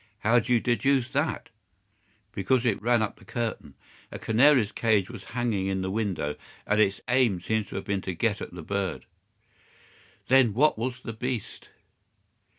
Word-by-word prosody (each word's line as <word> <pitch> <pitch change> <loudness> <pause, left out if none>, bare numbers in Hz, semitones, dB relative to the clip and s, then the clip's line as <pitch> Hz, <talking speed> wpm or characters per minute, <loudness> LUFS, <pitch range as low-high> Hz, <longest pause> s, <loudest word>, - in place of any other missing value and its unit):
"How 115 +3 +4
do 120 +2 -4
you 120 - +5
deduce 125 +2 +1
that?" 145 +3 -1 0.8
"Because 120 +6 0
it 110 -5 +1
ran 120 0 +2
up 105 - -4
the - - -17
curtain. 115 -2 -4 0.4
A - - -6
canary's 120 -1 +4
cage 105 -2 +1
was 115 -5 -10
hanging 115 -6 0
in 95 -1 -1
the 95 - -2
window, 95 -9 -2 0.3
and 105 +1 +2
its 100 -2 +1
aim 125 -7 +2
seems 110 +3 -1
to - - -9
have - - -4
been 100 -1 -1
to 95 -1 -4
get 105 +2 0
at - - -6
the 90 -2 -9
bird." 100 +1 -3 1.2
"Then 130 -5 +4
what 150 +5 +4
was 125 +3 -4
the 115 - -6
beast?" 120 0 -5
110 Hz, 170 wpm, -27 LUFS, 100-125 Hz, 1.2 s, you